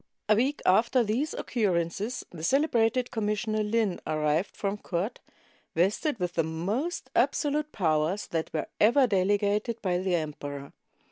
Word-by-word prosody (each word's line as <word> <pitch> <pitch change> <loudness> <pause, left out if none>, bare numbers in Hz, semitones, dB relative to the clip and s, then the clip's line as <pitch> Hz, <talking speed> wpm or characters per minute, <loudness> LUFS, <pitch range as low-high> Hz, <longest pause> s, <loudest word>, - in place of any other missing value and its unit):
A 215 - +5
week 265 +7 0
after 235 +6 +4
these 240 +9 -1
occurrences 205 +2 -1
the 160 -3 -9
celebrated 250 - +2
Com 220 -3 -1
missioner 215 +1 0
Lin 210 -3 0
arrived 155 +3 0
from 200 0 -2
court, 185 +5 -3 0.6
vested 205 - +1
with 180 -1 -2
the 165 - +1
most 195 - -3
absolute 300 0 +1
powers 160 +1 0
that 165 -1 -3
were 155 - -2
ever 250 +6 +5
delegated 205 +2 +1
by 180 -2 +1
the 185 -1 0
emperor. 145 -3 -5
205 Hz, 140 wpm, -28 LUFS, 170-235 Hz, 0.6 s, A